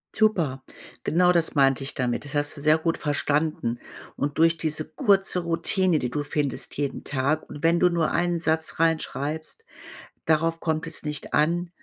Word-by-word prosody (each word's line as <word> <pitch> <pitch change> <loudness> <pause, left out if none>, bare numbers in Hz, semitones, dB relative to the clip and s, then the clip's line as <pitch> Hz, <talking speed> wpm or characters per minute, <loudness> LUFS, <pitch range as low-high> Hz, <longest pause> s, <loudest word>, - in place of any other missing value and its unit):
Super, 170 -12 +1 0.4
genau 180 +3 +3
das 170 -2 +1
meinte 135 -1 +3
ich 135 - -5
damit. 125 0 -2
Das 145 - -9
hast 145 0 -1
du - - -5
sehr 155 +2 +5
gut 165 +1 -1
verstanden. 145 -4 -1 0.4
Und 145 0 -3
durch 165 +1 +4
diese 155 -1 -2
kurze 195 -7 +1
Routine, 170 +1 +1
die 125 - -2
du 145 +4 -2
findest 145 -1 -3
jeden 140 -1 -3
Tag, 145 +3 0
und 145 - -9
wenn 170 +1 +4
du 180 - +5
nur 170 -2 0
einen 175 -1 +1
Satz 160 -1 -1
reinschreibst, 160 - -1 0.6
darauf 165 +1 +2
kommt 160 0 -2
es 160 - -4
nicht 150 -2 -5
an, 170 +3 +2
155 Hz, 170 wpm, -25 LUFS, 145-170 Hz, 0.6 s, sehr